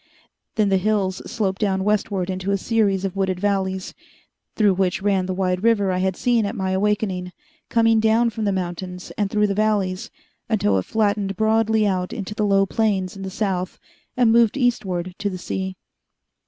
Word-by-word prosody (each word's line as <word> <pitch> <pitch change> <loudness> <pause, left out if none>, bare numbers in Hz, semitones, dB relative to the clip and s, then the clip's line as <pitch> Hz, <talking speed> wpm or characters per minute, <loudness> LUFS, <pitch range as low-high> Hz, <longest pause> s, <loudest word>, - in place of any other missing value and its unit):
Then 215 -3 +2
the 195 - +3
hills 195 -2 0
sloped 205 -4 -1
down 190 -2 +1
westward 200 -2 0
into 185 +1 -4
a 200 - +2
series 200 -2 +1
of 195 - -3
wooded 190 -2 -1
valleys, 190 -1 -1 0.6
through 210 -3 +4
which 190 0 0
ran 195 -2 +1
the 185 - -1
wide 185 -1 0
river 210 -4 +3
I 180 - 0
had 190 0 0
seen 240 -2 +2
at 200 - -3
my 190 -1 -2
awakening, 190 -2 0 0.4
coming 225 -1 +4
down 225 +2 +3
from 220 0 -3
the 200 - +2
mountains 180 0 -4
and 205 -2 0
through 210 0 +2
the 200 - 0
valleys 200 -3 0 0.4
until 105 - +2
it 95 - -5
flattened 205 -2 0
broadly 220 0 +2
out 185 -2 -1
into 205 0 -5
the 210 0 0
low 195 0 +4
plains 195 -3 0
in 195 - -9
the 190 - -4
south 190 -2 -2 0.4
and 240 -3 +4
moved 230 +1 +4
eastward 185 -8 -1
to 205 0 -1
the 185 - -5
sea. 190 +1 -4
195 Hz, 185 wpm, -22 LUFS, 185-215 Hz, 0.6 s, through